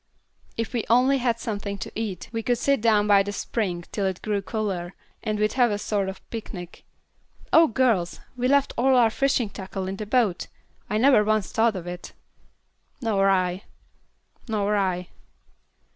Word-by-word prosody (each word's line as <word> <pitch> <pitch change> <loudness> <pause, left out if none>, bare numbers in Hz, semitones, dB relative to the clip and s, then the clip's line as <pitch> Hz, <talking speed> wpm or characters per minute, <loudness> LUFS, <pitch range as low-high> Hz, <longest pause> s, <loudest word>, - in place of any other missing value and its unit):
"If 230 +2 -3
we 235 -3 0
only 255 +4 +4
had 240 -2 +1
something 205 -3 -4
to - - -6
eat 210 -5 -4
we 225 -1 -2
could 245 +2 0
sit 275 0 +1
down 215 -2 +3
by 205 -1 +5
the 205 +1 -3
spring 195 -4 -2
till 200 -2 -1
it 190 -1 -4
grew 205 -2 -1
cooler, 195 -4 -3 0.3
and 215 -2 -2
we'd 215 0 +1
have 245 -2 +3
a 205 - -1
sort 205 -2 -1
of 190 - -6
a - - -24
picnic. 185 -6 -7 0.7
Oh, 325 0 +7
girls, 225 - +1 0.2
we 250 0 0
left 280 +1 +3
all 265 +2 +4
our 235 -3 +5
fishing 265 -4 +1
tackle 190 -1 -5
in 195 +1 -4
the 215 - -5
boat! 220 -6 +1 0.4
I 210 - 0
never 250 -2 +5
once 215 -1 0
thought 225 -1 +2
of 180 -2 -5
it." 175 0 -7 0.9
"Nor 205 -6 +2
I." 185 -1 +1 0.9
"Nor 210 -2 0
I." 185 -2 -1
210 Hz, 175 wpm, -25 LUFS, 195-235 Hz, 0.9 s, Oh